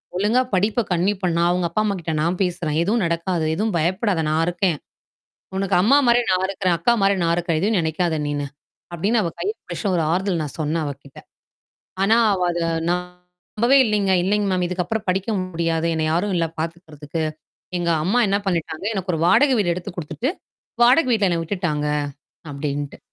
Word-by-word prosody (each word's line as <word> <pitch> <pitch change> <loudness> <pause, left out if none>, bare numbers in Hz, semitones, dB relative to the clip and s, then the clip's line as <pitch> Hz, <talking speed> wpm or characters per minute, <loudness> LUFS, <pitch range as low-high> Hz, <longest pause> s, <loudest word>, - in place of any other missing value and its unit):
"ஒழுங்கா 210 +7 +2
படிப்ப 210 +5 +2
கன்டினியூ 180 +4 +2
பண்ணா 170 -2 +1
அவுங்க 180 -1 0
அப்பா, 190 +6 0
அம்மாக்கிட்ட 180 -6 -2
நான் 170 +3 0
பேசுறேன். 170 -4 -2
எதுவும் 210 +5 +1
நடக்காது. 170 0 -1
எதுவும் 215 +2 -1
பயப்படாத! 185 +2 0
நான் 155 +1 +2
இருக்கேன். 175 -2 0 0.8
உனக்கு 195 0 0
அம்மாமாரி 245 +2 +4
நான் 185 0 +2
இருக்கேன். 185 -2 0
அக்கா 170 +9 +2
மாரி 195 0 +3
நான் 170 0 +2
இருக்கேன். 170 -2 -1
எதுவும் 210 +2 +2
நினைக்காத 160 0 0
நீனு," 145 -1 -2 0.5
அப்பிடின்னு 205 +7 +1
அவ 170 - -1
கைய 410 - -1
புடிச்சு - - -7
ஒரு 165 - +1
ஆறுதல் 180 -1 0
நான் 145 - -7
சொன்னேன் 155 +1 -1
அவகிட்ட. 140 -1 -8 0.8
ஆனா, 215 +4 +4 0.2
அவ 185 - -2
அத 175 - -3 0.3
நம்பவே 180 +7 -1
இல்லேங்க. 205 -3 +1
"இல்லங்க 205 +2 +1
மேம். 180 -1 +1
இதுக்கப்பறம் 185 +4 -3
படிக்க 190 +2 0
முடியாது. 165 -2 -1
என்னைய 155 0 0
யாரும் 190 +4 0
இல்ல 165 - +1
பாத்துக்குறதுக்கு. 160 -2 -5 0.6
எங்க 170 -1 0
அம்மா 200 +8 +2
என்ன 200 +1 +2
பண்ணிட்டாங்க, 165 -2 -2
எனக்கு 190 -2 -2
ஒரு 160 - -2
வாடகை 275 +9 +5
வீடு 180 -5 +2
எடுத்துக் 175 0 -7
கொடுத்துட்டு, 200 - -2 0.5
வாடகை 255 +3 +5
வீட்ல 210 -5 +3
என்ன 170 -1 0
விட்டுட்டாங்க" 165 -5 -2 0.7
அப்பிடின்னுட்டு. 145 0 -4
180 Hz, 165 wpm, -22 LUFS, 165-200 Hz, 0.8 s, வாடகை